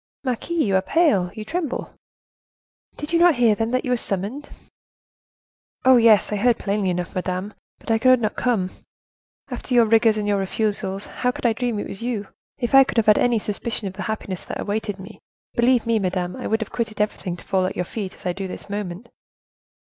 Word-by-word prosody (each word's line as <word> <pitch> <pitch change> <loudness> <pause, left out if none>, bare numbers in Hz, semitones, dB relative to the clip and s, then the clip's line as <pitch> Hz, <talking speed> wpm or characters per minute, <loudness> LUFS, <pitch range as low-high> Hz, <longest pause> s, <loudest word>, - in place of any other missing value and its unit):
"Marquise, 295 +6 -1
you 195 -2 +1
are 190 - +4
pale, 205 - +2
you 215 - -6
tremble." 320 +1 -3 1.0
"Did 295 +3 -5
you 335 - +4
not 345 -2 +6
hear, 235 -3 +4
then, 225 +2 -1
that 255 +1 0
you 250 - -1
were 250 - +3
summoned?" 215 +8 -2 1.4
"Oh, 260 -1 +7
yes; 225 -4 +5
I 210 - 0
heard 235 +2 +3
plainly 200 -1 -1
enough, 180 0 -3
madame; 185 +2 -3 0.2
but - - -5
I 225 - +3
could 255 +1 +5
not 215 -2 -1
come. 205 -7 0 0.8
After 255 - -3
your 235 -1 +6
rigors 225 0 +4
and 210 -1 -2
your 205 -1 +2
refusals, 195 0 -1
how 250 - -2
could 250 - -5
I 235 - +4
dream 240 -1 -2
it - - -3
was 195 - -8
you? 230 -4 -3 0.3
If 240 -2 -3
I 270 0 +9
could 260 - -5
have 225 - +4
had 210 -1 +5
any 240 -1 +3
suspicion 215 0 -3
of 185 - -6
the 200 - -7
happiness 200 -4 -4
that - - -6
awaited 205 -1 -2
me, 195 +2 -11 0.3
believe 240 0 +3
me, 230 -1 +2
madame, 180 -2 -2
I - - -5
would 220 +1 0
have 220 - -5
quitted 225 -3 -3
everything 200 -4 -2
to - - -13
fall 185 -1 +1
at - - -5
your 180 - -2
feet, 195 0 -5
as - - -19
I 180 - 0
do 195 +1 -5
at - - -3
this 195 - -8
moment." 200 +1 -5
215 Hz, 215 wpm, -22 LUFS, 195-240 Hz, 1.4 s, I